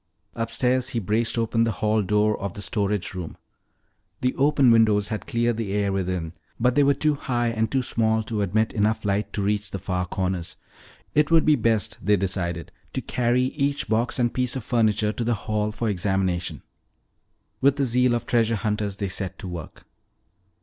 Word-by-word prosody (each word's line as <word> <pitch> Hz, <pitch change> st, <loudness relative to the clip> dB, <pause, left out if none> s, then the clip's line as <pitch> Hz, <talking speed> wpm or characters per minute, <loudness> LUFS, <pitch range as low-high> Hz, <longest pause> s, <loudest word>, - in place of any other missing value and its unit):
Upstairs 125 Hz, +2 st, 0 dB
he -, -, +2 dB
braced 115 Hz, +3 st, +1 dB
open 115 Hz, 0 st, +1 dB
the 115 Hz, -1 st, 0 dB
hall 110 Hz, +3 st, +1 dB
door 105 Hz, +2 st, +2 dB
of 100 Hz, -2 st, -4 dB
the 105 Hz, -, -6 dB
storage 100 Hz, -1 st, -1 dB
room. 90 Hz, -4 st, -6 dB, 0.8 s
The 125 Hz, 0 st, +1 dB
open 140 Hz, -2 st, +4 dB
windows 110 Hz, -3 st, +4 dB
had 110 Hz, -2 st, -4 dB
cleared 120 Hz, -1 st, 0 dB
the 105 Hz, -4 st, -3 dB
air 100 Hz, -1 st, 0 dB
within 90 Hz, -4 st, -2 dB, 0.3 s
but 125 Hz, +2 st, +3 dB
they 145 Hz, -, +4 dB
were 140 Hz, 0 st, +4 dB
too 150 Hz, +2 st, +2 dB
high 120 Hz, -4 st, -1 dB
and 110 Hz, -1 st, 0 dB
too 130 Hz, -1 st, +1 dB
small 110 Hz, -2 st, +1 dB
to 110 Hz, -1 st, -2 dB
admit 105 Hz, +3 st, +1 dB
enough 110 Hz, 0 st, 0 dB
light 100 Hz, +1 st, 0 dB
to 100 Hz, -, -1 dB
reach 105 Hz, 0 st, 0 dB
the 100 Hz, -, -4 dB
far 90 Hz, -1 st, -2 dB
corners. 90 Hz, -1 st, -3 dB, 0.6 s
It 150 Hz, 0 st, +3 dB
would 165 Hz, -1 st, +4 dB
be 155 Hz, -, +5 dB
best, 110 Hz, -2 st, 0 dB
they 105 Hz, 0 st, +3 dB
decided, 90 Hz, -3 st, -2 dB, 0.2 s
to -, -, -2 dB
carry 125 Hz, +1 st, +1 dB
each 140 Hz, +2 st, -1 dB
box 115 Hz, +2 st, 0 dB
and 120 Hz, -2 st, +1 dB
piece 125 Hz, 0 st, 0 dB
of 130 Hz, -, -4 dB
furniture 110 Hz, -3 st, +1 dB
to 120 Hz, -, -3 dB
the 120 Hz, 0 st, +1 dB
hall 105 Hz, 0 st, -2 dB
for 115 Hz, +2 st, -3 dB
examination. 95 Hz, -3 st, -1 dB, 1.0 s
With 140 Hz, +1 st, +4 dB
the 140 Hz, -1 st, +1 dB
zeal 125 Hz, 0 st, +2 dB
of 120 Hz, -, -3 dB
treasure 115 Hz, -1 st, +2 dB
hunters 105 Hz, -1 st, -2 dB
they 100 Hz, 0 st, -3 dB
set 95 Hz, 0 st, -4 dB
to 95 Hz, -, -8 dB
work. 85 Hz, -4 st, -8 dB
110 Hz, 190 wpm, -24 LUFS, 100-120 Hz, 1.0 s, be